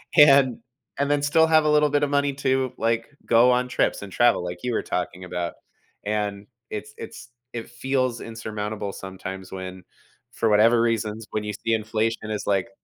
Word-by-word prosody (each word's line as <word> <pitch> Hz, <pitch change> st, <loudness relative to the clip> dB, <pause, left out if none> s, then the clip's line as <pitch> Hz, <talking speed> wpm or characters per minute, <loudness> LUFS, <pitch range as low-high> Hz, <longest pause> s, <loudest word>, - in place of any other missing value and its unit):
and 140 Hz, -5 st, +6 dB, 0.4 s
and 140 Hz, 0 st, +1 dB
then 145 Hz, -1 st, +2 dB
still 160 Hz, +2 st, +4 dB
have 155 Hz, -1 st, +4 dB
a -, -, +3 dB
little 150 Hz, 0 st, +4 dB
bit 145 Hz, 0 st, +1 dB
of 145 Hz, -, +1 dB
money 140 Hz, 0 st, +1 dB
to, 130 Hz, -2 st, 0 dB
like, 115 Hz, 0 st, 0 dB, 0.2 s
go 120 Hz, +2 st, +5 dB
on 125 Hz, 0 st, +2 dB
trips 125 Hz, -, 0 dB
and 100 Hz, -, -9 dB
travel 120 Hz, -3 st, +3 dB
like 90 Hz, 0 st, -5 dB
you 125 Hz, -1 st, -1 dB
were -, -, 0 dB
talking 90 Hz, 0 st, -3 dB
about, 90 Hz, -1 st, -3 dB, 0.5 s
and 105 Hz, -1 st, -2 dB, 0.2 s
it's 105 Hz, 0 st, -6 dB
it's 115 Hz, +1 st, -9 dB, 0.2 s
it 115 Hz, 0 st, -6 dB
feels 130 Hz, 0 st, -1 dB
insurmountable 105 Hz, -2 st, -5 dB
sometimes 95 Hz, 0 st, -8 dB
when, 95 Hz, -1 st, -7 dB, 0.5 s
for 115 Hz, -1 st, 0 dB
whatever 115 Hz, +3 st, +5 dB
reasons, 115 Hz, -1 st, -1 dB
when 105 Hz, -, -2 dB
you 105 Hz, 0 st, -4 dB
see 115 Hz, +3 st, -2 dB
inflation 110 Hz, 0 st, -1 dB
is 105 Hz, -1 st, -3 dB
like 100 Hz, +1 st, +1 dB
115 Hz, 180 wpm, -24 LUFS, 105-130 Hz, 0.5 s, and